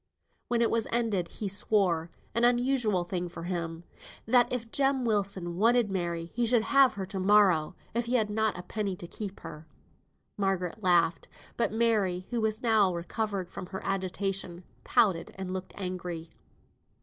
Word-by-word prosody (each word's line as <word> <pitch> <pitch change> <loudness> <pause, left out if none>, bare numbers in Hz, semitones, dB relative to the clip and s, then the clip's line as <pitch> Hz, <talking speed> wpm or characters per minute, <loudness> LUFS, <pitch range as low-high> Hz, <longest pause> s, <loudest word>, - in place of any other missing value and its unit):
When 235 -1 +2
it 230 - +1
was 230 -1 +1
ended, 220 -7 0
he 205 - -5
swore 190 -4 +2 0.2
(an 235 - +1
unusual 240 -5 +2
thing 175 0 -3
for 165 - -8
him) 170 -2 -4 0.4
that 245 +1 +4
if 235 -2 -4
Jem 270 -2 +1
Wilson 195 -5 -1
wanted 230 +1 +3
Mary 170 -2 -3
he 240 0 0
should 230 -1 +3
have 275 +1 +4
her 195 -2 -3
to 195 0 -5
morrow, 185 -5 +4 0.2
if 235 +1 0
he 245 +2 0
had 220 -4 +3
not 220 -2 0
a 180 - -7
penny 200 0 -3
to 175 - -9
keep 200 +3 -7
her. 160 -1 -9 0.7
Margaret 195 -1 -1
laughed, 175 -3 +3 0.3
but 235 - 0
Mary, 210 -5 +1
who 240 -2 0
was 215 +1 -1
now 220 -5 +4
recovered 195 +2 -3
from 180 - -7
her 190 0 -6
agitation, 190 -1 -2 0.2
pouted, 185 -7 +2
and 190 -1 -5
looked 185 0 -6
angry. 180 -3 -5
195 Hz, 165 wpm, -29 LUFS, 180-225 Hz, 0.7 s, that